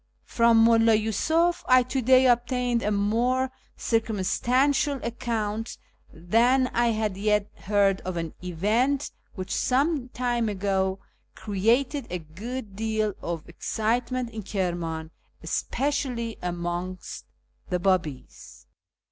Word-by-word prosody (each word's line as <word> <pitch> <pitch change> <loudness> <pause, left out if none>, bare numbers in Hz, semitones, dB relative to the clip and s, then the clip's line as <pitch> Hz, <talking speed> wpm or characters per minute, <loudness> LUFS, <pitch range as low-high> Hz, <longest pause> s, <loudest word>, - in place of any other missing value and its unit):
From 230 -1 +3
Mulla 225 -1 +5
Yiisuf 320 - +1
I 255 0 +6
to 255 +2 -2
day 260 +2 +5
obtained 245 0 +2
a 210 - 0
more 235 +6 +1 0.3
circum 225 -2 0
stantial 270 +8 +1
account 225 -2 -3 0.3
than 235 +10 +2
I 240 0 +2
had 215 -4 -1
yet 210 0 +1
heard 200 -1 +1
of 185 -2 -4
an 165 -2 -4
event 220 - 0 0.2
which 185 -1 -4
some 275 0 +1
time 240 -2 -1
ago 190 -1 0 0.4
created 230 +7 0
a 180 - -2
good 200 +7 -7
deal 215 -1 -1
of 170 -2 -5
excitement 235 +7 -2
in 220 -1 -6
Kirman, 170 -5 -3 0.3
especially 255 -5 -2
amongst 175 +1 -4 0.4
the 180 - +1
Babis. 175 -7 -2
225 Hz, 115 wpm, -26 LUFS, 190-250 Hz, 0.4 s, I